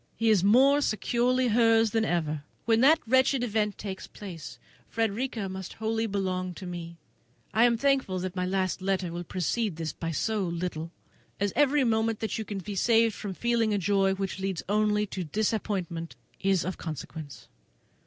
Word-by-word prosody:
He 225 Hz, -1 st, +2 dB
is 195 Hz, -4 st, +4 dB
more 265 Hz, +8 st, +5 dB
securely 245 Hz, +2 st, +1 dB
hers 225 Hz, -1 st, +4 dB
than 225 Hz, 0 st, +1 dB
ever. 155 Hz, -7 st, -1 dB, 0.2 s
When 225 Hz, 0 st, +3 dB
that 305 Hz, +5 st, +7 dB
wretched 260 Hz, +1 st, +3 dB
event 210 Hz, -3 st, 0 dB
takes 195 Hz, -2 st, -6 dB
place, 175 Hz, -7 st, -9 dB, 0.3 s
Frederica 225 Hz, -1 st, -1 dB
must 190 Hz, -1 st, -7 dB
belong -, -, -25 dB, 0.2 s
wholly 225 Hz, -, +1 dB, 0.5 s
to 180 Hz, 0 st, -7 dB
us. 170 Hz, -1 st, -7 dB, 0.6 s
I 225 Hz, +2 st, +5 dB
am 235 Hz, -1 st, +3 dB
thankful 270 Hz, -7 st, +1 dB
that 185 Hz, 0 st, -4 dB
my 180 Hz, -, -1 dB
last 185 Hz, -1 st, -1 dB
letter 190 Hz, -2 st, -1 dB
will 175 Hz, +1 st, -4 dB
precede 185 Hz, +3 st, -1 dB
this 160 Hz, -1 st, -4 dB
by 165 Hz, -, -4 dB
so 210 Hz, +6 st, -1 dB
little, 170 Hz, -2 st, -3 dB, 0.5 s
as 200 Hz, 0 st, 0 dB
every 290 Hz, -1 st, +4 dB
moment 225 Hz, -2 st, +1 dB
that 220 Hz, 0 st, -2 dB
you -, -, -2 dB
can 205 Hz, -, -5 dB
be 200 Hz, +2 st, -5 dB
saved 225 Hz, +3 st, +3 dB
from 200 Hz, -3 st, -6 dB
feeling 230 Hz, -2 st, +1 dB
a -, -, +1 dB
joy 195 Hz, 0 st, +2 dB
which 195 Hz, 0 st, -4 dB
leads 190 Hz, -3 st, -2 dB
only 210 Hz, +1 st, +2 dB
to 190 Hz, -2 st, -5 dB
disappointment 185 Hz, -3 st, -2 dB, 0.2 s
is 195 Hz, -3 st, +1 dB
of 185 Hz, -, -4 dB
consequence. 155 Hz, -2 st, -7 dB
205 Hz, 175 wpm, -28 LUFS, 185-225 Hz, 0.6 s, that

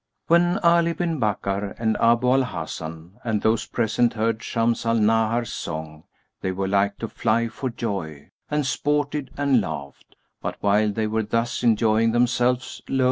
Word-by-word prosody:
When 175 Hz, +2 st, +3 dB
Ali 170 Hz, 0 st, +4 dB
bin 165 Hz, -2 st, -2 dB
Bakkar 100 Hz, -2 st, -1 dB
and 110 Hz, -1 st, 0 dB
Abu 120 Hz, +2 st, +3 dB
al 135 Hz, +1 st, +4 dB
Hasan 85 Hz, -4 st, -6 dB
and 110 Hz, -3 st, -1 dB
those 110 Hz, 0 st, +1 dB
present 115 Hz, +1 st, +1 dB
heard 115 Hz, 0 st, -1 dB
Shams 115 Hz, 0 st, 0 dB
al 115 Hz, 0 st, +1 dB
Nahar's 115 Hz, +1 st, +2 dB
song, 80 Hz, 0 st, -6 dB, 0.4 s
they 95 Hz, -, -1 dB
were 95 Hz, +1 st, -2 dB
like 100 Hz, +1 st, +1 dB
to 115 Hz, -, -4 dB
fly 115 Hz, +2 st, 0 dB
for 130 Hz, +3 st, -4 dB
joy, 95 Hz, -11 st, -5 dB, 0.2 s
and 150 Hz, -1 st, 0 dB
sported 145 Hz, 0 st, -1 dB
and 140 Hz, -4 st, +3 dB
laughed; 70 Hz, -7 st, -7 dB, 0.3 s
but -, -, -3 dB
while 105 Hz, +1 st, +3 dB
they 110 Hz, +2 st, -1 dB
were 110 Hz, +1 st, 0 dB
thus 115 Hz, +3 st, -1 dB
enjoying 115 Hz, -1 st, +3 dB
themselves 125 Hz, +1 st, +1 dB
lo! 135 Hz, -, 0 dB
115 Hz, 160 wpm, -24 LUFS, 100-125 Hz, 0.4 s, Ali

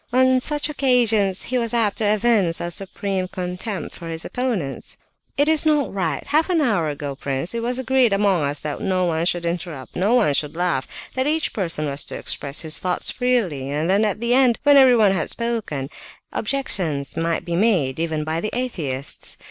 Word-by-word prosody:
On 260 Hz, +1 st, +4 dB
such 295 Hz, +3 st, 0 dB
occasions 235 Hz, -9 st, +2 dB
he 255 Hz, 0 st, -1 dB
was 235 Hz, 0 st, +1 dB
apt 225 Hz, -2 st, +1 dB
to 220 Hz, -, +1 dB
evince 205 Hz, -5 st, +2 dB
a 175 Hz, -, -3 dB
supreme 195 Hz, +1 st, -3 dB
contempt 180 Hz, +3 st, -5 dB
for 170 Hz, -1 st, -8 dB
his 165 Hz, 0 st, -4 dB
opponents. 225 Hz, -, -3 dB, 0.4 s
"It 290 Hz, +1 st, +3 dB
is 315 Hz, -1 st, +4 dB
not 300 Hz, -6 st, +1 dB
right! 170 Hz, -7 st, -2 dB
Half 310 Hz, +4 st, +2 dB
an 350 Hz, -3 st, +2 dB
hour 210 Hz, -, +1 dB
ago, 145 Hz, -1 st, -5 dB
prince, 135 Hz, -, -3 dB
it 230 Hz, -, -2 dB
was 245 Hz, +2 st, -1 dB
agreed 260 Hz, -2 st, +2 dB
among 195 Hz, -3 st, +2 dB
us 140 Hz, +1 st, -1 dB
that 150 Hz, -1 st, -4 dB
no 185 Hz, -1 st, 0 dB
one 165 Hz, 0 st, 0 dB
should 175 Hz, -1 st, 0 dB
interrupt, 170 Hz, -6 st, -5 dB
no 205 Hz, +7 st, +2 dB
one 210 Hz, -12 st, +3 dB
should 150 Hz, +2 st, -1 dB
laugh, 175 Hz, -7 st, 0 dB, 0.3 s
that 260 Hz, +1 st, -1 dB
each 315 Hz, +1 st, +1 dB
person 165 Hz, -6 st, -2 dB
was 140 Hz, 0 st, -2 dB
to -, -, -5 dB
express 140 Hz, 0 st, -2 dB
his 160 Hz, -1 st, 0 dB
thoughts 180 Hz, -1 st, 0 dB
freely; 210 Hz, -, 0 dB
and 155 Hz, +5 st, 0 dB
then 200 Hz, +3 st, +3 dB
at 210 Hz, -1 st, 0 dB
the 235 Hz, +1 st, +1 dB
end, 255 Hz, -3 st, +4 dB
when 290 Hz, 0 st, +6 dB
everyone 245 Hz, -7 st, +6 dB
had 180 Hz, -5 st, -1 dB
spoken, 225 Hz, -, -3 dB, 0.4 s
objections 185 Hz, -, 0 dB
might 165 Hz, +1 st, -1 dB
be 170 Hz, -1 st, -2 dB
made, 170 Hz, -, +2 dB
even 160 Hz, -2 st, -1 dB
by 160 Hz, +2 st, -2 dB
the 215 Hz, -, -2 dB
atheists. 150 Hz, -, -4 dB
195 Hz, 195 wpm, -21 LUFS, 160-245 Hz, 0.4 s, when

